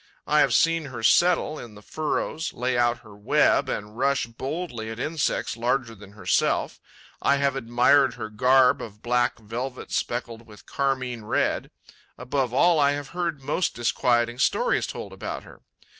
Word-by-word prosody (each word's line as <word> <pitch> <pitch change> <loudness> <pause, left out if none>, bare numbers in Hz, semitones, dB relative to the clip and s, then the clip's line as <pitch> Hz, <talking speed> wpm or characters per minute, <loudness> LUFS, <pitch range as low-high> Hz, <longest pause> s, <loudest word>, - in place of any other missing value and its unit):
I - - +3
have - - +4
seen 165 -1 +3
her 125 -5 -7
settle 170 +2 +3
in 115 -3 -10
the 105 - -14
furrows, 155 +3 -3
lay 125 +1 -1
out 120 0 +1
her 110 -4 -15
web 105 - +2
and 105 +1 -5
rush 135 +2 +1
boldly 125 0 -5
at 110 - -6
insects 155 -3 -1
larger 120 0 -1
than 100 -2 -14
herself; 105 - 0 0.4
I 140 - +3
have 140 -1 +1
admired 130 +2 +3
her 110 -3 -6
garb 125 +3 +4
of 105 -1 -10
black 120 0 +1
velvet 120 +4 -6
speckled 120 -1 -3
with 105 -2 -15
carmine 130 -5 -2
red; - - 0 0.5
above 125 0 -1
all, 165 +6 +4
I 140 0 +4
have 145 0 -5
heard 170 -5 -3
most 150 +6 -1
disquieting 120 0 +1
stories - - +1
told - - -7
about - - -6
her. - - -16
125 Hz, 160 wpm, -25 LUFS, 115-140 Hz, 0.5 s, have